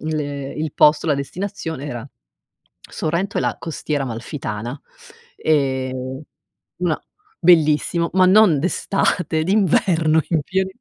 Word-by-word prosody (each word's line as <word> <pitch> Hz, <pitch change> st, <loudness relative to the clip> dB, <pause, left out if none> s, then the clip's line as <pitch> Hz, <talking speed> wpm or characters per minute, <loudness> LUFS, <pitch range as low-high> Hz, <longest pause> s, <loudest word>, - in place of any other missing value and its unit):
l 155 Hz, 0 st, -2 dB, 0.4 s
il 155 Hz, -1 st, -3 dB
posto, 150 Hz, +2 st, +4 dB
la 150 Hz, -, +3 dB
destinazione 160 Hz, 0 st, -5 dB
era 120 Hz, 0 st, -6 dB, 0.8 s
Sorrento 170 Hz, +6 st, -2 dB
e -, -, +1 dB
la -, -, -1 dB
Costiera 150 Hz, -3 st, -3 dB
Amalfitana. 120 Hz, 0 st, -5 dB, 0.6 s
Ehm, 130 Hz, -2 st, -1 dB, 0.6 s
una 175 Hz, -3 st, -1 dB, 0.4 s
bellissimo 170 Hz, 0 st, +3 dB
ma 185 Hz, -1 st, +5 dB
non 190 Hz, -5 st, +6 dB
d'estate, 180 Hz, -1 st, 0 dB
d'inverno 170 Hz, -4 st, +3 dB
in 165 Hz, -3 st, +1 dB
pien 190 Hz, +5 st, -1 dB
155 Hz, 110 wpm, -20 LUFS, 140-180 Hz, 0.8 s, non